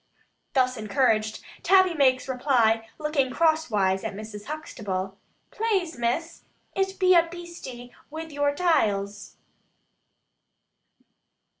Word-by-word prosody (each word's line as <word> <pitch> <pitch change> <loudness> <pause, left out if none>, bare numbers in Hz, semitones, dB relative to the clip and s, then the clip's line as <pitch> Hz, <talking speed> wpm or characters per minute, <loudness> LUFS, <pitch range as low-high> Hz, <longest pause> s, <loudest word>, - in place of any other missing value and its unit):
Thus 255 -2 +2
encouraged, 215 0 +1 0.2
Tabby 375 -2 +5
makes 265 -4 +3
reply, 235 -4 +2
looking 300 -3 0
cross 315 +2 +2
wise 190 -3 +1
at - - -4
Mrs. 210 0 -8
Huxtable. 195 -11 -4 0.4
"Plase, 405 -7 -1
Miss, 250 +8 -2 0.3
it 385 0 -1
be 370 -1 +5
a 340 -1 +5
beastie 335 -9 -9 0.2
wi 320 +2 -6
vour 290 -2 0
taials." 205 - 0
260 Hz, 105 wpm, -26 LUFS, 220-330 Hz, 0.4 s, Tabby